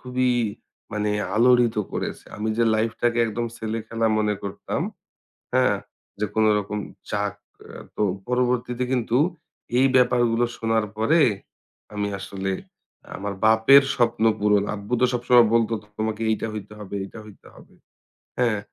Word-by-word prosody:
খুবই 125 0 0 0.6
মানে 105 0 -1 0.3
আলোড়িত 120 -1 +4 0.2
করেছে। - - -4
আমি 105 +1 -2
যে 115 - +4
লাইফটাকে 115 +2 0
একদম 115 +2 -2
ছেলে 110 +1 -3
খেলা 115 0 0
মনে 105 -1 +1
করতাম, 100 - -4 0.7
হ্যাঁ? - - +3 0.4
যে 105 - +1
কোনো 110 0 +4
রকম 105 +1 -3 0.3
চাক - - -1 0.6
তো - - -3 0.3
পরবর্তীতে 125 0 0
কিন্তু 125 -1 +1 0.6
এই 135 - +5
ব্যাপারগুলো 120 -2 +3
শোনার 115 -1 +1
পরে 155 +9 +3 0.7
আমি 105 0 -1
আসলে 95 0 -4 0.7
আমার 100 +1 -4
বাপের 110 +6 +7
স্বপ্ন 115 -2 +1 0.2
পূরণ, 105 -1 +3
আব্বু 100 +4 -7
তো 125 - +6
সবসময় 120 -1 +5
বলত, 115 -1 +3 0.3
"তোমাকে 110 0 -2
এইটা 110 - -1
হইতে 105 0 -7
হবে, 100 -1 -7
এইটা 100 +3 -9
হইতে 105 -2 -15
হবে।" - - -17 0.7
হ্যাঁ? 115 -4 +2
115 Hz, 135 wpm, -24 LUFS, 105-125 Hz, 0.7 s, বাপের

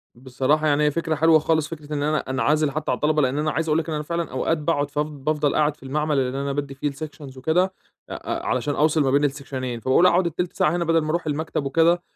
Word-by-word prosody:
بصراحة، 130 +5 0
يعني 145 +1 +2
هي 150 - +3
فكرة 165 0 -1
حلوة 160 +1 +5
خالص 155 0 +1
فكرة 150 -2 -8
إن 145 - -1
أنا 155 +1 +1
أنعزل 145 +3 +1
حتى 155 -2 -2
عن - - +1
الطلبة 150 0 +2
لأن 135 +2 0
أنا 155 0 0
عايز 165 +1 -2
أقول 155 +2 +3
لك 165 - -4
إن 155 - -2
أنا 150 - -3
فعلًا 170 +2 -3
أوقات 155 +5 0
باقعد، 145 -2 -1
ف 145 - -3
بافضل 150 0 -1
قاعد 150 -1 +2
في - - -18
المعمل 150 +1 0
اللي 130 +1 -1
أنا 140 - -2
بَادّي 140 -1 -3
فيه 145 +1 -2
الsections 145 -2 -9
وكده، 160 +7 +2
أ 190 0 -10
أ 340 +1 -4
علشان 150 - -1
أوصِل 155 +1 +2
ما 135 -2 +2
بين 145 +1 +3
السكشنين 135 -4 -3
فباقول 130 +9 +3
أقعد 175 -1 +3
1/3 175 +3 -3
ساعة 150 - +1
هنا 175 -1 -1
بدل 165 0 +3
ما 155 - -4
أروح 170 +1 -1
المكتب 150 -1 -2
وكده، 165 +5 +3
150 Hz, 250 wpm, -23 LUFS, 140-160 Hz, -, حلوة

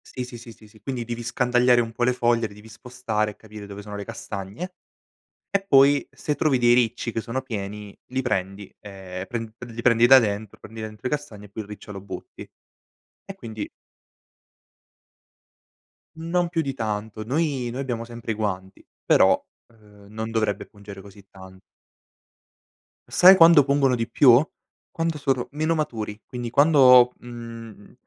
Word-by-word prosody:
Sì, 125 - -3
sì, 125 -1 -9
sì, 115 -1 -12
sì, 110 - -18
sì, 110 0 -20
quindi 130 -3 -4
devi 120 0 -5
scandagliare 125 +1 +2
un 115 -1 -4
po' 120 +2 -3
le 125 - +2
foglie, 120 -2 +1
le 100 - -15
devi 105 +2 -15
spostare 110 -3 -3
e - - -18
capire 105 -1 -11
dove 100 0 -9
sono 105 0 -8
le 100 - -6
castagne, 115 - -7 0.7
e 200 0 0
poi 140 -3 +5
se 150 - -3
trovi 145 -5 +2
dei 120 0 +4
ricci 120 -1 0
che 115 - -2
sono 125 +3 -4
pieni 105 -4 -7
li 130 +1 -2
prendi 100 -4 -3
e 95 -2 -8
pren 115 -2 -5
pre 120 -2 -10
li 115 +1 -6
prendi 115 -1 +4
da 135 0 +9
dentro 105 -2 -3
prendi 110 +1 -10
dentro 110 -1 -8
le 150 - +1
castagne, 110 -9 -11
e - - -15
poi 110 +2 -6
il 100 - -17
riccio 105 0 -10
lo 95 - -8
butti. 105 - -10 0.8
E 195 - -9
quindi 110 - -7 2.5
Non 170 +2 -1
più 165 -2 0
di 135 -3 -3
tanto. 110 -2 -4
Noi 135 -1 -1
noi 130 +3 -4
abbiamo 120 -4 -3
sempre 115 -1 -6
i - - -2
guanti 95 -3 -4 0.2
però, - - +4 0.3
ehm, 105 -3 -20
non 110 +1 -5
dovrebbe 110 -3 -1
pungere 100 -1 -12
così 100 0 -16
tan 95 0 -14 1.5
Sai 185 +1 +7
quando 165 -3 +8
pungono 140 -2 +2
di 115 0 -3
più? 130 +2 +6 0.5
Quando 165 -1 -2
sono 135 -3 -1
meno 155 +3 0
maturi, 110 -8 -4
quindi 120 -2 -6
quando, 130 -3 +6
mhmm, 115 -3 -10
115 Hz, 170 wpm, -24 LUFS, 105-130 Hz, 2.5 s, da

